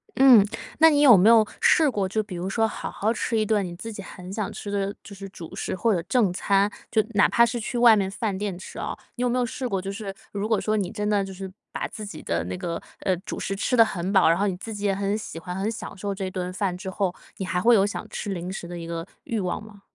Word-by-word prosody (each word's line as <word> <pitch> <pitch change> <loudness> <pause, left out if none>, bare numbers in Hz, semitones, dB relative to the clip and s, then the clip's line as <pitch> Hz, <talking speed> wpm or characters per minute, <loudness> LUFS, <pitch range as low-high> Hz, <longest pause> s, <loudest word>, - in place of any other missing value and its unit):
嗯， 255 -6 +8 0.4
那 320 - +8
你 290 -2 +3
有 265 -6 +9
没 195 +4 +6
有 225 -2 +7 0.2
试 325 - +5
过， 200 -4 0
就 215 +2 0
比 190 -3 -8
如 180 +2 -3
说， 225 +2 +2
好 - - -5
好 220 +3 0
吃 230 -1 -1
一 215 - +2
顿 210 -1 +2
你 175 -2 -6
自 225 +5 -7
己 200 - -7
很 185 -1 -10
想 210 -2 -2
吃 205 - -6
的 200 0 -1
就 205 - -11
是 195 0 -8
主 170 -4 -10
食 - - -3
或 220 +4 +2
者 175 - 0
正 215 -7 +3
餐， 200 +2 +2 0.2
就 220 -2 +3
哪 205 - +5
怕 235 - +5
是 240 +1 -2
去 235 +2 -4
外 235 -2 +7
面 195 -2 0
饭 205 0 -2
店 200 -2 -3
吃 190 - -9
啊， - - -4 0.2
你 245 - -5
有 250 - +2
没 250 - 0
有 250 - +2
试 255 +2 -4
过， 195 -4 -1
就 195 +1 -4
是 200 -1 -6 0.2
如 205 +1 -2
果 220 - +3
说 215 - 0
你 200 -4 -1
真 210 -2 -3
的， 205 -2 +2
就 195 - -7
是 190 0 -7 0.2
把 - - -3
自 215 - -8
己 200 - -9
的 - - -1
那 - - -4
个， 175 -2 -4 0.2
呃， 185 - +1
主 190 - -6
食 195 - -2
吃 250 +5 0
得 230 - +9
很 185 -2 -3
饱， 190 -4 +5
然 165 - +4
后 205 - +2
你 185 - -1
自 220 +4 -7
己 205 0 -4
也 195 - +2
很 200 +1 0
喜 215 - -7
欢、 180 +2 -6
很 195 +3 -1
享 225 -2 -6
受 200 +1 -4
这 190 -1 -4
顿 180 -1 -3
饭 185 -1 -1
之 190 +1 -6
后， 190 -2 -1 0.2
你 190 - -3
还 180 -1 -1
会 235 +2 +6
有 195 -2 +4
想 205 - -4
吃 205 - -4
零 180 0 -4
食 175 -2 -6
的 175 - -7
一 165 - -7
个 165 0 -4 0.2
欲 230 - -2
望 185 +1 -2
吗？ 210 -2 -14
200 Hz, 310 characters per minute, -25 LUFS, 190-220 Hz, 0.4 s, 有